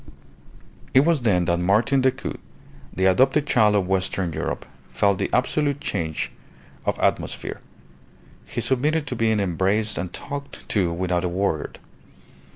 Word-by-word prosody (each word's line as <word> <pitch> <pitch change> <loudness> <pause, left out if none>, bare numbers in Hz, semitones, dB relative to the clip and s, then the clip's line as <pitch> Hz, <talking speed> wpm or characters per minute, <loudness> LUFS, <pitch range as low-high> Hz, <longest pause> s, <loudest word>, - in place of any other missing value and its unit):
It 135 - +8
was 160 -1 +2
then 95 -7 +2
that 85 0 +1
Martin 110 +9 +3
Decoud, 130 0 -1 0.5
the 95 - 0
adopted 135 +10 +4
child 110 -6 +4
of 100 -2 +2
Western 95 -2 -1
Europe, 80 - -3 0.2
felt 100 -2 +1
the - - -1
absolute 140 +3 +1
change 80 - -2 0.6
of - - +1
atmosphere. - - -1 0.9
He - - -3
submitted 145 +4 +1
to 130 - -4
being 110 -2 +2
embraced 100 +3 0
and 90 0 -4
talked 140 +6 -7
to 95 -5 +1
without 90 +1 -1
a 90 - 0
word. 90 -3 -2
100 Hz, 140 wpm, -23 LUFS, 90-130 Hz, 0.9 s, It